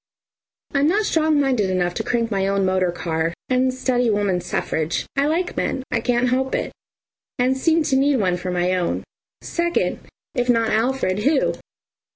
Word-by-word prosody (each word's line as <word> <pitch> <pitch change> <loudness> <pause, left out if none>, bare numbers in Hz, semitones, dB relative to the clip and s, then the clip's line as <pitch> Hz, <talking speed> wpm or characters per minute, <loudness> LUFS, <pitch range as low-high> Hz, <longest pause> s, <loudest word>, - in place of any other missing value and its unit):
I'm 280 +1 +3
not 415 +6 +2
strong 315 -4 +2
minded 255 -8 +1
enough 180 -1 0
to - - -3
crank 230 -1 -1
my 195 -1 0
own 195 0 +1
motor 185 -1 +1
car 165 -1 -2
and 255 0 +2
study 250 -2 0
woman's 200 -4 0
suffrage. 160 +1 -1
I 280 +1 +2
like 340 +4 -1
men, 265 - -1
can't 240 +1 +1
help 265 +1 0
it, - - -2 0.7
and 255 +1 +2
seem 320 +4 +2
to 280 -3 +1
need 280 +1 +3
one 185 -7 +1
for 180 +1 -5
my 180 0 0
own. 180 -2 -1 0.4
Second 345 0 -1 0.3
if 245 -4 -1
not 230 -2 +3
Alfred, 225 -4 +1
who? 275 +6 +2
245 Hz, 170 wpm, -22 LUFS, 185-270 Hz, 0.7 s, I'm